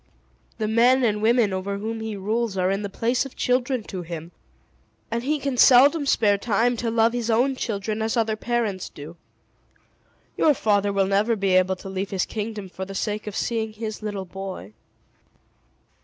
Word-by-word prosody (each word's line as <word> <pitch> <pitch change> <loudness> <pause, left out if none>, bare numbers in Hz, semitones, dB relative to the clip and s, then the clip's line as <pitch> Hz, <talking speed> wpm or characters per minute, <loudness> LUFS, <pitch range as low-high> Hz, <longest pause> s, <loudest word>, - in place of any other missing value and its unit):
The 215 - -1
men 245 +4 +4
and 210 -3 +1
women 225 -2 +3
over 195 +1 -3
whom 225 +2 -4
he 220 -1 -4
rules 215 +1 -1
are 185 0 +1
in 195 +1 -1
the 205 - -4
place 235 +5 0
of 275 - -10
children 250 -1 0
to 185 -3 -6
him; 165 -1 -7 0.8
and 230 +1 -1
he 295 +5 0
can 275 -2 -3
seldom 280 +5 +6
spare 205 -6 +3
time 235 +3 +1
to 230 +1 -2
love 225 0 +2
his 240 -1 -2
own 250 +4 +2
children 215 -2 -3
as 220 +2 -1
other 225 -1 +1
parents 220 -5 -2
do. 150 +3 -10 1.2
Your 300 -2 +3
father 205 -3 +1
will 195 -1 +2
never 205 +4 +2
be 195 -2 0
able 185 0 +3
to 185 - -11
leave 190 +1 -3
his 190 -2 -1
kingdom 215 -2 -5
for 185 +1 -7
the 195 +1 -7
sake 210 +1 -3
of 205 - -5
seeing 220 -2 -2
his 215 0 -6
little 205 -3 -4
boy." 185 - -8
215 Hz, 185 wpm, -24 LUFS, 195-235 Hz, 1.2 s, seldom